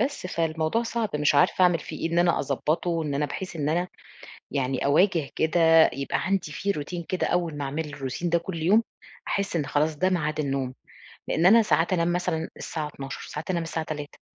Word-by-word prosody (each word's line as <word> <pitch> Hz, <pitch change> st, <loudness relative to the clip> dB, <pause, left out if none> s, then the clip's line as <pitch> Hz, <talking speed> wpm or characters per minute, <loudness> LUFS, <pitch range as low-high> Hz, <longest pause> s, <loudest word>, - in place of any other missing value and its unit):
بس، 270 Hz, -5 st, -1 dB
فالموضوع 160 Hz, +4 st, 0 dB
صعب 230 Hz, -1 st, -2 dB
مش 150 Hz, 0 st, +2 dB
عارفة 145 Hz, +5 st, +4 dB
أعمل 175 Hz, -2 st, +5 dB
فيه -, -, -8 dB
إيه؟ -, -, -7 dB
إن 170 Hz, -, +2 dB
أنا 175 Hz, -1 st, +3 dB
أضبّطه، 165 Hz, +4 st, -1 dB
إن 145 Hz, -2 st, -2 dB
أنا 150 Hz, +1 st, 0 dB
بحيث 175 Hz, +4 st, -6 dB
إن 145 Hz, -1 st, -1 dB
أنا 175 Hz, +3 st, 0 dB, 0.6 s
يعني 135 Hz, -2 st, -1 dB
أواجه 155 Hz, +1 st, +3 dB
كده، 165 Hz, 0 st, +5 dB
يبقى 140 Hz, +2 st, -2 dB
عندي 190 Hz, -4 st, 0 dB
في 200 Hz, +6 st, -1 dB
روتين 170 Hz, +1 st, -5 dB
كده 185 Hz, +2 st, -1 dB
أوّل 170 Hz, -4 st, -1 dB
ما 145 Hz, -, -3 dB
أعمل 150 Hz, +3 st, -3 dB
الروتين 140 Hz, +5 st, -3 dB
ده 170 Hz, -, +3 dB
كل 170 Hz, -1 st, -6 dB
يوم، 205 Hz, +8 st, +4 dB, 0.4 s
أحس 200 Hz, -2 st, -1 dB
إن 155 Hz, -4 st, 0 dB
خلاص، 150 Hz, +2 st, 0 dB
ده 185 Hz, +4 st, +2 dB
ميعاد 155 Hz, -4 st, -1 dB
النوم، 135 Hz, -3 st, -1 dB, 0.5 s
لأن 165 Hz, -, +1 dB
أنا 225 Hz, +5 st, +8 dB
ساعات 170 Hz, -4 st, +2 dB
أنام 170 Hz, -1 st, +1 dB
مثلًا 175 Hz, -2 st, -1 dB
الساعة 155 Hz, -2 st, -4 dB
00:00، 135 Hz, -2 st, -7 dB
ساعات 150 Hz, +3 st, -6 dB
أنام 170 Hz, -2 st, -1 dB
الساعة 160 Hz, 0 st, -3 dB
03:00 150 Hz, -2 st, -6 dB
160 Hz, 200 wpm, -26 LUFS, 150-180 Hz, 0.6 s, أنا